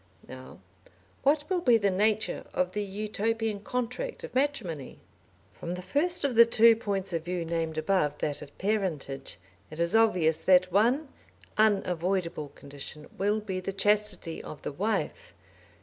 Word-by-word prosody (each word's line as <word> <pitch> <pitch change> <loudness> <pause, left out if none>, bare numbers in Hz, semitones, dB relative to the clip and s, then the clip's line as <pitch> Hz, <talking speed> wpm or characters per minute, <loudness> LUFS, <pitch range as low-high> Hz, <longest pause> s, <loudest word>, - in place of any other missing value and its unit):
Now 130 0 -11 0.6
what 295 +1 +2
will 365 -2 0
be 245 -7 +5
the 200 -3 +1
nature 210 +3 +1
of 180 0 +1
the 210 - -2
Utopian 215 +2 -2
contract 250 - -4
of - - -8
matrimony? 235 - -2 0.6
From 175 +1 -5
the 180 - -7
first 340 - 0
of 280 -3 +1
the 235 0 +9
two 230 0 +6
points 195 -4 -2
of 165 -1 -1
view 175 -1 -2
named 165 -1 -2
above, 155 -3 +1
that 145 -1 -3
of 145 -1 -12
parentage, 165 - -2 0.3
it 155 - -9
is 170 +4 +1
obvious 180 -8 +3
that 185 -1 +4
one 240 - +3 0.5
unavoidable 185 -6 +1
condition 140 +2 -9
will 205 +2 +1
be 195 -3 -4
the 185 +1 -4
chastity 205 -4 +2
of 150 - -10
the - - -3
wife. 205 +10 -3
195 Hz, 150 wpm, -28 LUFS, 170-225 Hz, 0.6 s, the